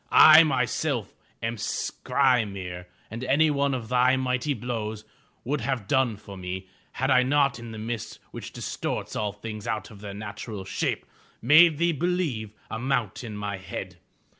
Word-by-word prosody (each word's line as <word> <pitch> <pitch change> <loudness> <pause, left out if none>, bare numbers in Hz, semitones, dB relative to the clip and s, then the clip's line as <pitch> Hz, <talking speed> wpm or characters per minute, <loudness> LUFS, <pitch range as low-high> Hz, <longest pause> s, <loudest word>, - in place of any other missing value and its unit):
I 155 +1 +10
myself 135 -3 0 0.3
am 115 +1 -2
Skry'mir 100 -9 0 0.2
and 115 +3 -5
any 145 +4 +3
one 140 -1 +1
of 120 -3 -5
thy 125 +2 +4
mighty 130 +2 0
blows 110 -2 -4 0.4
would 140 +3 -1
have 130 -8 -2
done 125 -4 +2
for 100 -1 -11
me, 95 0 -5 0.3
had 135 +1 0
I 130 -1 +6
not 140 0 +2
in 115 -1 -8
the 110 - -7
mist, 110 0 -5
which - - -7
distorts - - -4
all 105 -1 -1
things 105 0 -7
out 110 +1 -3
of 100 -2 -13
their 100 -2 -7
natural 105 -1 -6
shape, 95 - -2 0.3
made 155 +5 +6
thee 170 +2 +2
believe 160 - -1 0.2
a 110 - -3
mountain 120 -4 -2
my 100 -1 -3
head. 95 - -7
120 Hz, 160 wpm, -26 LUFS, 105-135 Hz, 0.4 s, I